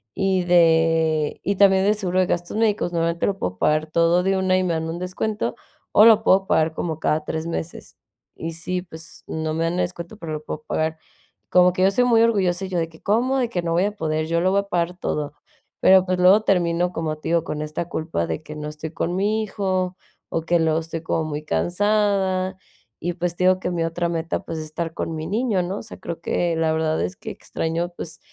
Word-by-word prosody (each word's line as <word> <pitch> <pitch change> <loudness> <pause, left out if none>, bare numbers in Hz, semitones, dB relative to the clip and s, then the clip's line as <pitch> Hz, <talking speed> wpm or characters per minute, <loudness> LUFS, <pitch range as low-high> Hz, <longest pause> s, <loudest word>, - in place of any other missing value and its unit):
y 190 -1 +1
de 165 -3 +3
y 200 - 0
también 195 -1 +5
de 210 - +4
seguro 185 -3 -1
de 185 - +4
gastos 175 +3 -2
médicos, 210 -5 +1
normalmente 170 0 0
lo 195 - -1
puedo 90 0 -3
pagar 155 +7 +1
todo 170 +2 +3
de 195 +1 +1
una 185 0 +2
y 185 - +1
me 175 -2 0
dan 160 0 -2
un 170 +1 -4
descuento, 185 +4 -2 0.4
o 215 - +7
lo 220 -1 +7
puedo 190 -1 +4
pagar 160 0 +2
como 160 -1 -3
cada 155 0 0
3 160 +2 -4
meses. 165 0 -6 0.4
Y 165 +1 -5
sí, 180 +2 -3
pues, 165 -2 -11
no 160 0 -3
me 165 +1 -1
dan 165 - 0
el 180 - -2
descuento, 175 +3 -5
pero 165 -6 -6
lo 155 0 -5
puedo 155 0 -6
pagar. 160 +1 -1 0.5
Como 180 0 +5
que 185 - 0
yo 190 - +5
soy 245 +5 +2
muy 230 -2 +4
orgullosa, 195 -5 +2
y - - -7
yo 180 - -2
de 165 -1 -2
que: 160 -1 -18
"¿Cómo, 245 +6 +1
de 245 -2 0
que 180 -6 -2
no 170 -1 -2
voy 175 +3 +3
a 205 - 0
poder?, 155 -4 -1
yo 170 +1 +1
lo 185 +1 +2
voy 200 - +3
a - - -10
pagar 175 -1 -1
todo". 150 -4 -3 0.5
Pero, 190 0 +6
pues, 185 -1 -1
luego 185 +4 +6
termino 175 -2 +1
como, 155 -2 -2
te 155 - -6
digo, 170 -1 +2
con 150 -1 -4
esta 155 +2 -4
culpa 155 - -2
de 80 -1 -4
que 155 - -9
no 150 0 -5
estoy 150 +1 -7
con 175 +2 -2
mi 210 +3 +1
hijo, 185 -3 -2 0.3
o 165 - -1
que 170 +1 +2
luego 160 -1 +2
estoy 165 0 -5
como 160 - 0
muy 150 -1 -4
cansada, 190 0 +1 0.5
y 175 +1 -1
pues, 175 0 -2
te 180 - 0
digo: 185 0 +4
"Que 180 - -3
mi 170 -2 -1
otra 170 +1 -1
meta, 165 -1 -2
pues, 165 -1 -5
es 155 - -5
estar 165 +1 -4
con 165 - -4
mi 155 0 -4
niño", 210 -1 0
¿no? 185 +3 -3
O - - -9
sea, 220 - -10
creo 170 - -6
que 170 -2 0
la 160 -1 +1
verdad 160 0 0
es 185 - -3
que - - -7
extraño 165 +2 -3
pues 160 -1 -7
175 Hz, 240 wpm, -22 LUFS, 160-190 Hz, 0.5 s, o